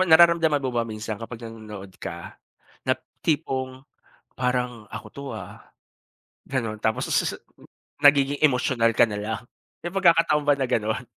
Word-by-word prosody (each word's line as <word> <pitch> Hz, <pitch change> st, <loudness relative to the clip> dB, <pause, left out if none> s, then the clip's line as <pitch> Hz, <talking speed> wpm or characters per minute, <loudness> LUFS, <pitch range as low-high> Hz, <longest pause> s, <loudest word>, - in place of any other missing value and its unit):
ba? 185 Hz, -, +2 dB
Nararamdaman 160 Hz, -3 st, +6 dB
mo 130 Hz, -, -1 dB
ba 120 Hz, -, +1 dB
minsan 110 Hz, 0 st, -5 dB
kapag 115 Hz, 0 st, -7 dB
nanonood 105 Hz, -4 st, -9 dB
ka, -, -, -7 dB, 0.4 s
na -, -, +1 dB, 0.2 s
tipong, 130 Hz, -4 st, -1 dB, 0.6 s
"Parang 125 Hz, -3 st, -1 dB
ako 105 Hz, +1 st, -8 dB
'to, 140 Hz, -, -9 dB
ah." 95 Hz, -5 st, -8 dB, 0.9 s
Gano'n? 115 Hz, -5 st, -2 dB
Tapos 110 Hz, -, +1 dB
sususu -, -, 0 dB, 0.6 s
nagiging 145 Hz, 0 st, +6 dB
emotional 125 Hz, -4 st, +3 dB
ka 115 Hz, -, +4 dB
nalang. 110 Hz, +3 st, -4 dB, 0.3 s
May 175 Hz, -, -5 dB
pagkakataon 165 Hz, -5 st, +4 dB
ba 145 Hz, -1 st, +3 dB
na 130 Hz, -, +1 dB
gano'n? 110 Hz, +2 st, 0 dB
125 Hz, 140 wpm, -25 LUFS, 110-145 Hz, 0.9 s, Nararamdaman